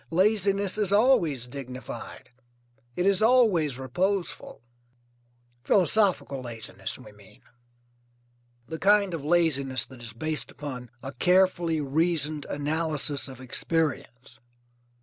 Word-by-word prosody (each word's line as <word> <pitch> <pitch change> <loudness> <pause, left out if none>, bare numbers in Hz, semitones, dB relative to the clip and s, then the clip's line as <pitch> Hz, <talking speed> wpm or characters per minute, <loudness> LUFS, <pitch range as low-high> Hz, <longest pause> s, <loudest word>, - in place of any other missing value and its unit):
Laziness 200 +1 +1
is 205 -3 0
always 200 - +3
dignified, 130 -1 -8 0.6
it 180 - 0
is 195 0 +3
always 215 - +3
reposeful. 175 - -3 1.0
Philosophical 190 -7 +2
laziness, 110 -5 -6
we 115 -5 -13
mean. 105 -2 -19 1.2
The 160 - -6
kind 200 -2 +3
of 160 -4 -4
laziness 145 -5 +1
that 130 -2 -14
is 115 -2 -8
based 155 +6 0
upon 130 -4 -7
a 135 0 -6
carefully 175 0 +2
reasoned 155 0 0
analysis 150 -1 -1
of 130 -2 -10
experience. 130 -3 -2
155 Hz, 105 wpm, -26 LUFS, 130-185 Hz, 1.2 s, always